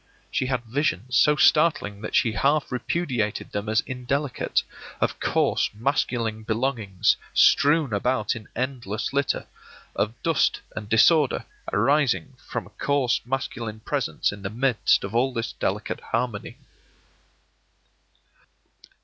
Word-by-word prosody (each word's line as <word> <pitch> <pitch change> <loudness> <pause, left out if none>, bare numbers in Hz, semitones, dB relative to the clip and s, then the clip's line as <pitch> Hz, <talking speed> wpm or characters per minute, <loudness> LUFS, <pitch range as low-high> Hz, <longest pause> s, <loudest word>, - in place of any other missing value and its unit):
She 130 - 0
had 125 -2 -1
visions, 125 - -1
so 150 - +5
startling 150 -11 +3
that 110 - -4
she 115 - +3
half 140 +7 +1
repudiated 125 -4 -2
them 105 +1 -3
as 110 +1 +3
indelicate, 130 +1 -1 0.4
of - - -1
coarse - - +1
masculine 115 -2 -1
belongings 110 -4 0 0.2
strewn 145 -4 +4
about 115 +1 0
in 110 -2 -9
endless 125 -3 -3
litter; 140 -1 0 0.5
of 110 +3 -1
dust 165 -3 +2 0.2
and 105 -1 -6
disorder 145 +6 +4 0.3
arising 140 -1 +2
necessarily 125 -2 -24
from - - -3
a - - -12
coarse 140 -4 +2
masculine 120 -4 -4
presence - - -1
in 100 0 -9
the 95 - -4
midst 125 +2 +2
of 100 - -5
all 125 +3 +2
this 115 -1 -2
delicate - - -2
harmony. 115 -3 -3
125 Hz, 125 wpm, -25 LUFS, 110-140 Hz, 0.5 s, so